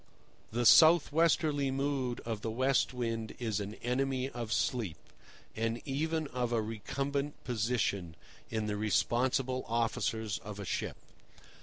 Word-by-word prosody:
The 120 +2 0
south 160 +5 +7
westerly 155 -3 +2
mood 135 -2 -1
of 115 -3 -4
the 115 - -2
West 130 +4 +2
Wind 115 -3 -3
is 110 -4 -1
an 100 +1 -5
enemy 130 +1 0
of 120 -2 -5
sleep, 110 -13 0 0.6
and 115 +1 -1
even 160 +3 -1
of 125 -1 -2
a 115 - +2
recumbent 140 +7 -3
position, 105 -7 -1 0.3
in 110 -1 -1
the 105 -1 -2
responsible 130 +4 +1
officers 110 -2 -1
of 105 -2 -8
a 100 - -5
ship. - - -3
120 Hz, 135 wpm, -32 LUFS, 110-135 Hz, 0.6 s, south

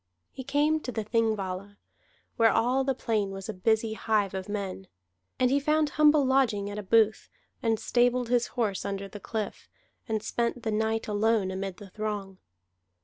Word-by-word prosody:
He 265 - -8
came 295 +4 +2
to 255 - -5
the 220 -2 -3
Thingvalla, 205 -3 -1 0.6
where 230 -1 +5
all 255 +4 +2
the 265 -1 0
plain 215 -5 -1
was 195 0 -7
a 220 - -3
busy 220 +3 +1
hive 215 -3 0
of 190 +1 -5
men. 195 -2 -4 0.5
And 255 0 +3
he 280 - +4
found 305 +1 +2
humble 300 -2 +5
lodging 235 -7 +2
at 205 - -5
a - - -3
booth, 215 +1 +2 0.3
and 225 -2 +1
stabled 245 0 +2
his 245 -1 +2
horse 210 -5 0
under 200 0 -4
the 205 +2 -9
cliff, 215 +1 -5 0.4
and 220 -1 -1
spent 235 0 -2
the 220 - -1
night 220 +1 0
alone 210 -2 +1
amid 190 0 -4
the 205 -3 -12
throng. 205 -3 -4
220 Hz, 175 wpm, -28 LUFS, 200-245 Hz, 0.6 s, where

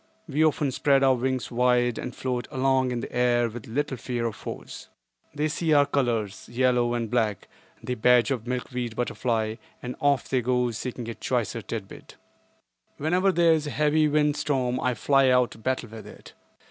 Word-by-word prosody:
We 150 +1 +1
often 150 -3 +2
spread 135 +1 +2
our 135 -1 +5
wings 130 0 -2
wide 125 -1 +2
and 125 - -6
float 125 -2 -3
along 130 0 +1
in 120 -1 -2
the - - -7
air 120 -1 +3
with 115 0 -9
little 135 +3 -2
fear 120 0 -3
of 115 - -2
foes. - - -8 0.5
They 150 +1 0
see 160 +1 0
our 145 -1 +6
colors—yellow 120 -1 0
and 115 -1 -2
black, 110 -4 -1 0.4
the 125 - -2
badge 125 +2 +4
of 120 -4 -2
the - - -7
milkweed 125 -2 -3
butterfly—and 115 0 -3
off 140 -2 +2
they 130 -2 +1
go 125 0 +1
seeking 120 +1 -5
a 115 - -4
choicer 115 -2 -2
tidbit. 105 -1 -8 0.8
Whenever 180 +6 +2
there 170 -2 +4
is 155 -2 -1
a - - -2
heavy 150 +1 +2
wind 150 0 +2
storm 130 -3 0
I 125 -1 0
fly 135 +4 +3
out 125 -2 +3
to - - -12
battle 130 0 -2
with 110 0 -10
it. - - -13
125 Hz, 180 wpm, -26 LUFS, 120-140 Hz, 0.8 s, our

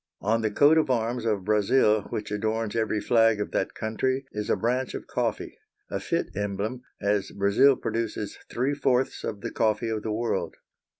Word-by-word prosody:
On 115 +3 +1
the 110 - +1
coat 145 +9 +5
of 155 - 0
arms 120 -1 0
of 105 -4 0
Brazil 105 0 +3
which 105 -1 -4
adorns 110 +1 -1
every 110 -1 0
flag 115 0 +3
of 105 - -3
that - - -1
country 130 +5 -1
is 105 0 -4
a - - +4
branch 125 +3 -1
of - - -6
coffee, - - -3 0.3
a - - -1
fit - - -2
emblem, 105 +5 -3 0.2
as 100 -1 0
Brazil 100 +8 +4
produces 110 -3 -3
three 130 +4 0
fourths 135 -2 0
of 100 -2 -4
the - - -4
coffee 110 0 +1
of 110 -1 -2
the 110 - -3
world. 115 +2 -2
110 Hz, 180 wpm, -26 LUFS, 105-125 Hz, 0.3 s, coat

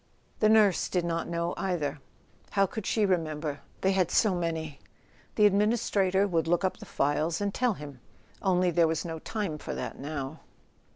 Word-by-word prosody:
The 215 - +4
nurse 215 -4 +4
did 180 -2 0
not 165 -1 -2
know 170 0 -1
either. 160 -6 -2 0.5
How 195 -1 +3
could 195 +2 -5
she 215 -2 +2
remember? 155 -5 -1 0.2
They 190 - +3
had 185 -3 +2
so 215 -4 +3
many! 160 -4 -3 0.6
The 210 - +5
administrator 200 -2 +2
would 165 -4 0
look 175 +2 +2
up 190 - 0
the - - -11
files 155 +4 0
and 200 -1 -1
tell 245 -4 +1
him. 145 -4 -9 0.4
Only 180 -2 +2
there 170 0 +4
was 160 +1 -1
no 165 -1 -5
time 195 -5 -3
for - - -5
that - - -5
now. 145 +1 -5
175 Hz, 175 wpm, -28 LUFS, 160-195 Hz, 0.6 s, The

